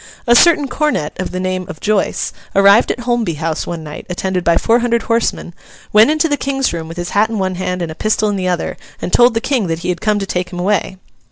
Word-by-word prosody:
A 240 -1 +4
certain 310 -1 +5
cornet, 290 - -1
of 185 - -2
the 185 - -4
name 185 -1 -2
of - - -8
Joice, 210 -1 -1 0.2
arrived 200 +3 +5
at 245 - -2
Holmby 235 -8 -1
House 160 +1 -3
one 170 -2 -5
night, 150 -1 -9
attended 180 0 -2
by 170 -1 +3
four 230 +1 +2
hundred 235 -1 0
horsemen, 230 -6 -1 0.4
went 215 +4 +6
into 310 +2 +2
the 290 -2 0
King's 270 -3 -1
room 165 -1 -5
with 165 +1 -9
his 175 0 -4
hat 215 +2 +2
in 225 - -3
one 190 -1 -1
hand 180 0 -3
and 165 - -4
a - - -5
pistol 215 +4 0
in 205 - -1
the 185 -1 -2
other, 180 -2 -2 0.2
and 180 - -5
told 240 -1 +5
the - - +2
King 250 -8 0
that 165 -1 -2
he - - -1
had 175 0 -2
come 210 -1 +1
to 200 - -2
take 180 -1 -3
him 180 - -7
away. 190 0 -1
195 Hz, 255 wpm, -16 LUFS, 180-235 Hz, 0.4 s, went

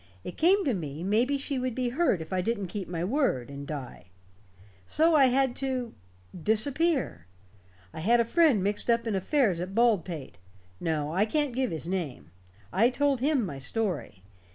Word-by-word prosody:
It 180 - -7
came 375 +4 +3
to 265 - +1
me 155 -4 -5
maybe 235 +9 +2
she 275 -1 -2
would 255 -2 -2
be 255 -1 -1
hurt 245 - +1
if 160 - -9
I 185 - +1
didn't 205 -2 -2
keep 195 -1 -5
my 170 -1 -3
word, 190 - 0
and 140 0 -8
die. 135 -10 -7 0.8
So 325 +1 +3
I 275 -3 +6
had 260 0 +1
to 260 -3 -2 0.4
disappear. 235 - +1 0.7
I - - -7
had 230 +9 +3
a 235 - +3
friend 280 - +3
mixed 205 +4 -1
up 235 0 +2
in 225 - -1
affairs 195 - +1
at 185 +3 -5
Baldpate. 190 - 0 0.4
No, 155 -2 -2
I 195 +4 +3
can't 290 +1 0
give 255 0 0
his 160 0 -5
name. 150 - -4 0.4
I 225 +6 +4
told 275 +1 +1
him 275 -3 +1
my 140 -7 -6
story. 150 - -3
225 Hz, 175 wpm, -28 LUFS, 170-265 Hz, 0.8 s, I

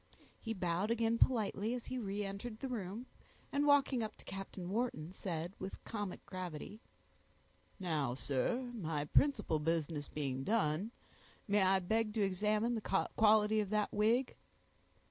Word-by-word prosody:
He 225 -1 -3
bowed 180 +2 0
again 230 0 +2
politely 220 -2 +2
as 245 - -6
he 255 - -3
reentered 205 +1 -4
the 270 - -3
room, 225 -1 -4 0.5
and 285 +1 +2
walking 280 -3 +4
up 215 -1 -3
to - - -17
Captain 195 -2 -6
Wharton, 200 -8 -1
said, 175 -2 -4
with 190 +1 -6
comic 205 -4 -5
gravity,— 185 +3 -6 1.0
"Now, 155 -9 0
sir, 240 - -1
my 160 -9 -2
principal 255 - +3
business 155 -1 -1
being 135 -3 -2
done, 200 -1 +1 0.6
may 205 0 +3
I 190 0 +5
beg 215 +4 0
to 215 - +2
examine 210 +5 +1
the 210 -4 0
quality 215 0 +5
of 205 -2 0
that 210 0 0
wig?" 230 +5 +2
205 Hz, 145 wpm, -36 LUFS, 175-225 Hz, 1.0 s, I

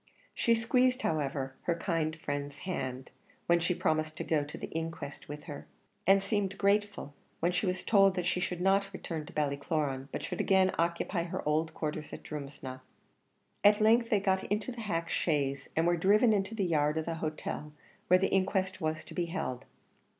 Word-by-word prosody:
She 235 - +3
squeezed, 250 +3 +2
however, 140 -3 -1
her 170 - +2
kind 165 -3 -1
friend's 145 -2 -4
hand, 130 -8 -4 0.3
when 170 0 +4
she 170 +1 0
promised 155 -1 0
to - - -3
go 155 -2 +1
to 145 - -8
the - - -7
inquest 165 -3 -5
with 150 0 -7
her, 150 -4 -8 0.4
and 195 0 +6
seemed 195 -1 -1
grateful 205 -6 +1 0.3
when 170 +2 +2
she 180 +3 0
was 180 0 -1
told 195 -3 +5
that 180 -2 -1
she 180 - +1
should 180 -1 -2
not 195 +1 +3
return 160 -5 -5
to - - -11
Ballycloran, 140 -2 -1
but - - -4
should - - -2
again 190 -1 +4
occupy 170 +1 0
her 170 - -4
old 160 +1 +1
quarters 155 -1 -4
at - - -8
Drumsna. 140 -3 -7 0.8
At 210 +1 +6
length 230 +2 +4
they 210 -4 +3
got 190 -1 +1
into 210 +5 -1
the 235 -1 -7
hack 170 -6 -2
chaise, 140 -6 0
and 160 - +2
were 175 0 +3
driven 210 +6 +5
into 200 +1 -1
the 200 -3 0
yard 150 -2 +2
of 160 - -1
the 170 - -2
hotel 155 -1 -4 0.4
where 180 - +7
the 190 +1 0
inquest 190 0 +1
was 155 0 -1
to - - -11
be 175 - 0
held. 165 -8 -4
170 Hz, 190 wpm, -31 LUFS, 150-195 Hz, 0.8 s, where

